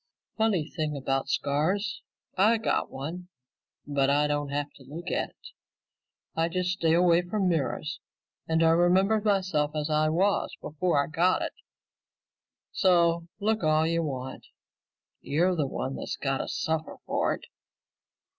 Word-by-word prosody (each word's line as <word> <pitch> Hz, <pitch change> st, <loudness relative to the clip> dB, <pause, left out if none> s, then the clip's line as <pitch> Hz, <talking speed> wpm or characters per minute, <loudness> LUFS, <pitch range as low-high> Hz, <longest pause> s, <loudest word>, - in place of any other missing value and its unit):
"Funny 210 Hz, -8 st, +1 dB
thing 155 Hz, -3 st, -3 dB
about 135 Hz, 0 st, -1 dB
scars. 160 Hz, +9 st, 0 dB, 0.3 s
I 215 Hz, +5 st, +4 dB
got 225 Hz, -, 0 dB
one, 165 Hz, +7 st, -6 dB, 0.6 s
but 140 Hz, -2 st, +1 dB
I 145 Hz, +1 st, +3 dB
don't 145 Hz, -1 st, -1 dB
have 145 Hz, +1 st, -2 dB
to 135 Hz, -, -15 dB
look 160 Hz, +7 st, -7 dB
at -, -, -1 dB
it. 480 Hz, -, -16 dB, 0.9 s
I 165 Hz, +1 st, +1 dB
just 180 Hz, +1 st, -1 dB
stay 165 Hz, -3 st, +2 dB
away 175 Hz, 0 st, +5 dB
from 190 Hz, +2 st, -1 dB
mirrors 155 Hz, -2 st, -1 dB, 0.5 s
and 160 Hz, 0 st, +2 dB
I 165 Hz, -, +5 dB
remember 185 Hz, +6 st, +4 dB
myself 185 Hz, -8 st, +1 dB
as 150 Hz, 0 st, -2 dB
I 155 Hz, 0 st, +3 dB
was 190 Hz, +6 st, +1 dB
before 150 Hz, -1 st, 0 dB
I -, -, -4 dB
got 170 Hz, +4 st, +2 dB
it. -, -, -4 dB, 1.2 s
So 170 Hz, -3 st, +3 dB
look 215 Hz, +1 st, +1 dB
all 155 Hz, 0 st, +3 dB
you 165 Hz, +1 st, +1 dB
want. 130 Hz, -4 st, -5 dB, 0.7 s
You're 175 Hz, +5 st, +1 dB
the 150 Hz, -4 st, 0 dB
one 130 Hz, 0 st, -4 dB
that's -, -, -4 dB
got 135 Hz, -1 st, -1 dB
to -, -, -3 dB
suffer 160 Hz, 0 st, -2 dB
for -, -, 0 dB
it." -, -, -13 dB
165 Hz, 150 wpm, -28 LUFS, 145-180 Hz, 1.2 s, away